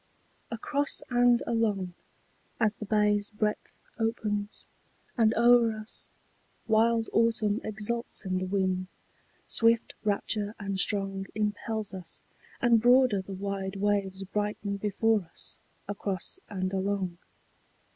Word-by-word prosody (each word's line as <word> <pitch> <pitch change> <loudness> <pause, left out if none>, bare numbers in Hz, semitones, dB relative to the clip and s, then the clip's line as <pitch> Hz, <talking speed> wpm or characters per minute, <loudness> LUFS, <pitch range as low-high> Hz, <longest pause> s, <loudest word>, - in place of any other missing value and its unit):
Across 280 +5 0
and 245 0 +4
along, 205 -6 0 0.7
as 215 -1 +3
the 210 - -7
bay's 210 -1 +2
breadth 210 0 -2 0.2
opens, 210 -2 -2 0.5
and 225 -3 +4
o'er 235 -1 +5
us 215 +1 -4 0.6
Wild 225 +1 +3
autumn 225 -2 +2
exults 215 +2 -3
in 185 -1 0
the 185 - -3
wind, 185 -1 0 0.6
swift 230 0 +2
rapture 210 0 0
and 195 -2 -2
strong 195 -1 +2
Impels 215 0 -2
us, 185 -2 -5 0.4
and 235 -3 +5
broader 245 -4 +5
the 190 +1 -7
wide 195 0 -3
waves 195 -1 0
brighten 205 0 -2
before 210 +2 +2
us 165 -2 -7 0.3
Across 200 - -3
and 185 -2 -2
along. 190 -2 -1
210 Hz, 115 wpm, -29 LUFS, 195-225 Hz, 0.7 s, o'er